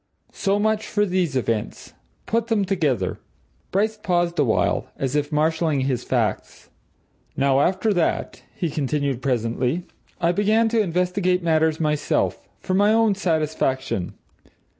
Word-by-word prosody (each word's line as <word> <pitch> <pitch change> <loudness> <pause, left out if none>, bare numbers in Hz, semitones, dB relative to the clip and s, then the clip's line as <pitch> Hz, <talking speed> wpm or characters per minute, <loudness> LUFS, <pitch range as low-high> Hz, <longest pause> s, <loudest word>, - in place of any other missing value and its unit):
So 200 0 0
much 220 +1 0
for 210 0 +1
these 180 -6 0
events. 115 -4 -2 0.3
Put 230 0 0
them 220 -4 +1
together." 145 - 0 0.5
Bryce 215 +3 0
paused 175 -2 0
awhile, 125 -7 +1
as 135 0 -2
if 145 0 0
marshalling 155 -1 +1
his 130 -2 -1
facts. - - -2 0.7
"Now, 135 0 +3
after 190 +7 +2
that," 175 -3 -1
he 170 -4 -2
continued 140 -3 -1
presently, 125 +5 -1 0.4
"I 170 0 +2
began 215 +4 +2
to 225 -1 +2
investigate 180 0 0
matters 160 -1 +2
myself 150 -2 0 0.2
for 185 - -2
my 205 +3 +4
own 225 -1 +4
satisfaction. 155 - -1
165 Hz, 130 wpm, -23 LUFS, 140-195 Hz, 0.7 s, my